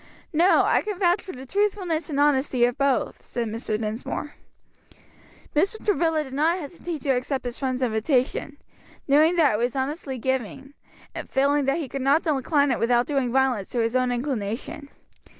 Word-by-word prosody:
"No, 345 +5 +5
I - - +3
can 420 -3 -4
vouch 350 -1 +2
for 380 - -8
the 260 +1 -9
truthfulness 375 -2 -1
and 285 -2 -2
honesty 270 -4 +3
of 245 0 -1
both," 275 -1 0
said 235 -2 -4
Mr. 215 -1 -3
Dinsmore. 225 +6 -4 1.2
Mr. 395 +8 0
Travilla 330 -6 +2
did 265 -2 -10
not 315 +5 +2
hesitate 335 -1 -6
to 275 - +1
accept 260 +1 -1
his 240 -1 -5
friend's 260 -1 -1
invitation, 255 +4 0 0.5
knowing 305 +5 +4
that 310 -8 +4
it - - +1
was 240 +2 -1
honestly 270 0 -3
given, 265 +2 -3 0.4
and - - -7
feeling 280 +1 +2
that 275 +3 +1
he 315 -5 -3
could 275 +1 -5
not 280 +5 +3
decline 285 -1 +1
it 245 - 0
without 240 +1 +2
doing 270 -4 -1
violence 255 -6 +1
to - - -5
his 230 +1 0
own 255 -1 +2
inclination. 260 +4 -4
275 Hz, 175 wpm, -24 LUFS, 250-310 Hz, 1.2 s, No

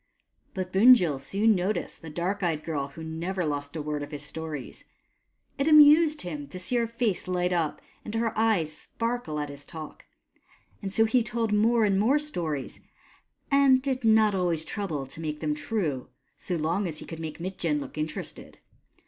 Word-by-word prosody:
But 185 -1 -4
Bunjil 190 - +6
soon 205 +10 +2
noticed 195 +2 -2
the 165 - -8
dark 180 +6 -2
eyed 160 -4 -1
girl 145 -4 -2
who 150 +4 -10
never 170 +3 -3
lost 145 -1 -3
a 155 - -3
word 150 -1 -3
of 145 - -6
his 145 -1 -5
stories. 155 -3 -6 0.8
It 275 - +1
amused 305 0 +7
him 150 -5 -5
to 165 - -9
see 215 +7 -1
her 235 -1 +1
face 230 -6 -1
light 180 0 0
up 165 -4 -1 0.2
and 215 - -6
her 225 0 0
eyes 205 -9 +1
sparkle 230 -10 -3
at 145 -1 -3
his 140 0 -10
talk; 155 +1 -9 0.8
and 195 -2 -4
so 225 +3 +4
he 240 +3 +3
told 225 -1 -1
more 225 +2 +4
and 195 -2 +2
more 245 +8 +4
stories, 170 - -3 0.7
and 275 -2 +6
did 260 -1 -2
not 220 -2 +5
always 175 -4 0
trouble 165 -10 -3
to 135 +4 -8
make 150 -1 -4
them 150 -1 -1
true, 155 - -2 0.3
so 180 - -4
long 170 +5 0
as 155 -3 -6
he - - -9
could 165 - -8
make 160 -1 -6
Mitjen 170 -4 -2
look - - -8
interested. 155 - -5
180 Hz, 180 wpm, -27 LUFS, 155-225 Hz, 0.8 s, amused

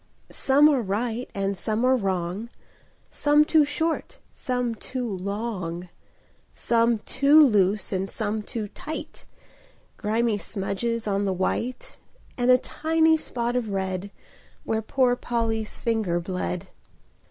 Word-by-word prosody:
[Pg - - -13
6] - - -3
Some 285 +2 +6
are 275 -4 +2
right 225 +4 -2
and 195 0 -1
some 215 +5 -1
are 260 +1 +5
wrong, 190 0 -2 0.6
Some 295 +1 +4
too 315 -1 +5
short 320 +3 -2
and - - -33
some 250 -2 -1
too 250 +2 -5
long, 185 -3 -4 0.6
Some 235 0 +2
too 280 +4 +5
loose 205 -4 +2
and 190 +1 -1
some 215 -1 -2
too 215 0 -5
tight; 310 +9 -7 0.7
Grimy 220 0 0
smudges 220 +4 -3
on 200 -1 0
the 195 - +1
white, 235 +7 -2 0.4
And 245 0 0
a 250 - +8
tiny 320 +4 +2
spot 240 -5 -2
of 240 -3 -1
red, 190 0 -2 0.5
Where 220 0 -1
poor 250 +2 +2
Polly's 225 -3 -2
finger 220 -7 0
bled. 175 - -4
225 Hz, 135 wpm, -25 LUFS, 195-250 Hz, 0.7 s, a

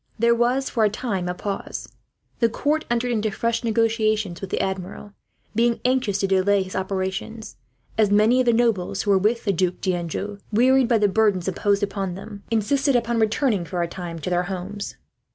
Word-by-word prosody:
There 235 +1 +4
was, 245 +3 +1
for 230 - 0
a 210 - +4
time, 200 -5 -3
a 180 - -3
pause. 200 +2 -5 0.5
The 230 - +3
court 300 +6 0
entered 240 +1 0
into 215 -2 0
fresh 230 +4 -1
negotiations 215 -4 +1
with 195 - -5
the - - -1
Admiral, 190 +2 -4 0.4
being 235 +1 +2
anxious 250 -6 +1
to 195 - +1
delay 195 +1 +3
his 185 - -9
operations; 190 +3 -3 0.4
as 215 -2 +4
many 215 +5 +4
of 255 - +1
the - - +6
nobles 225 -6 +1
who 205 - +1
were 195 - +5
with 225 +5 0
the 200 - +2
Duc 180 0 0
D'Anjou, 185 +3 -3
wearied 255 +3 +4
by 235 -2 +3
the 210 -1 +3
burdens 200 -3 +2
imposed 200 +2 +1
upon 195 -3 -2
them, 200 +1 -9
insisted 265 +5 +1
upon 235 -1 +1
returning 220 -2 +1
for 175 0 -2
a - - -1
time 170 -1 -6
to 165 +3 -4
their 175 0 +2
homes. 195 +2 -5
210 Hz, 190 wpm, -23 LUFS, 190-235 Hz, 0.5 s, the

